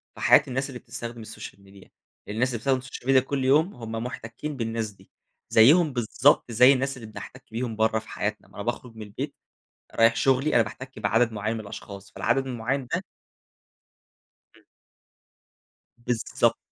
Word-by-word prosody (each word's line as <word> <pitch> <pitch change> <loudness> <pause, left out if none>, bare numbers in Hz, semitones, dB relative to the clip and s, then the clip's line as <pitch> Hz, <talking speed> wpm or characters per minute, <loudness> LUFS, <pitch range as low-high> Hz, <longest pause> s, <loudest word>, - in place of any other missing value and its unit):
في - - -10
حياة 145 - +7
الناس 130 +2 -2
اللي 125 -2 -7
بتستخدم 120 -1 -7
السوشيال 110 -2 -10
ميديا، 95 0 -17 0.4
الناس 110 +5 +1
اللي 120 - -2
بتستخدم 135 +3 +1
السوشيال 130 -1 -9
ميديا 135 -1 +6
كل 135 0 -2
يوم 155 +8 +4
هُم 115 -2 -8
محتكِّين 115 +5 -5
بالناس 115 -2 -2
دي، 100 - -22 0.4
زيهُم 150 +7 +6
بالضبط 120 +2 +2
زي 125 +4 +7
الناس 135 0 -1
اللي 115 -3 -9
بنحتك 110 - -10
بيهُم 115 0 -3
برّه 110 0 +2
في 110 - -15
حياتنا. 105 +1 -3
ما - - -21
أنا 100 - -5
باخرُج 120 +1 -4
من 110 - -9
البيت 130 +8 -6 0.6
رايح 115 0 +4
شغلي 135 +3 +2
أنا 120 - +6
باحتِك 130 +4 -9
بعدد 115 0 +2
معيَّن 110 +1 -2
من 115 - -4
الأشخاص، 100 -1 -9
فالعدد 135 +2 0
المعيَّن 125 +2 -2
ده - - -1 1.6
امم. - - -22 1.4
بالضبط، 120 -3 +1
120 Hz, 165 wpm, -26 LUFS, 110-130 Hz, 1.6 s, حياة